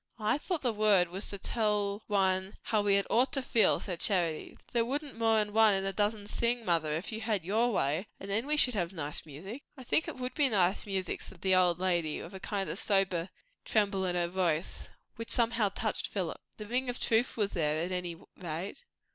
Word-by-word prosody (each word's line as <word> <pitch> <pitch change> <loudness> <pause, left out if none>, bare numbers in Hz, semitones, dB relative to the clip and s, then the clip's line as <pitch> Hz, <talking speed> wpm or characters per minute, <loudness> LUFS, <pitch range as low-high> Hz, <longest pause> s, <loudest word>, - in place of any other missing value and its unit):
"I 220 +5 0
thought 340 -2 -3
the 245 -3 +1
words 205 -5 +4
was 195 +3 -4
to 200 - -4
tell 210 -1 -1
one 190 -1 +1
how 215 -2 +1
we 205 -1 +3
had 200 - +2
ought 250 +4 +3
to 270 - 0
feel!" 235 -4 +3
said 180 -4 -5
Charity. 175 -6 0
"There 235 -1 +2
wouldn't 280 +4 -3
more'n 220 -2 +2
one 220 -2 +6
in 195 0 -1
a 195 - -1
dozen 210 0 +1
sing, 235 +2 -1
mother, 165 -3 +1
if 165 +9 -3
you 220 0 -4
had 215 -6 -1
your 225 +6 +2
way; 160 +1 0
and 195 - -8
then 220 +6 0
we 300 0 +1
should 250 -4 +4
have 180 -3 -1
nice 150 -4 -3
music!" 190 - -8 0.2
"I 260 - -9
think 315 +6 +1
it 325 - -5
would 250 0 -4
be 290 -3 +3
nice 195 -2 +2
music," 190 -2 -3
said 180 - -11
the 190 0 +2
old 180 -2 +4
lady, 175 -4 0
with 170 - -9
a 190 - -7
kind 195 0 -3
of - - -2
sober 190 -3 +1 0.3
tremble 200 -3 +1
in 180 -1 -1
her 175 -1 +1
voice, 175 -2 -1 0.3
which 230 0 -6
somehow 230 -3 +3
touched 215 +2 -2
Philip. 185 -5 -4 0.2
The 215 - -7
ring 250 +4 -1
of 245 - -3
truth 230 +2 +1
was 205 -2 +1
there, 155 -1 0
at 180 - -6
any 180 -2 -3 0.2
rate. 175 - -6
200 Hz, 220 wpm, -31 LUFS, 180-225 Hz, 0.3 s, one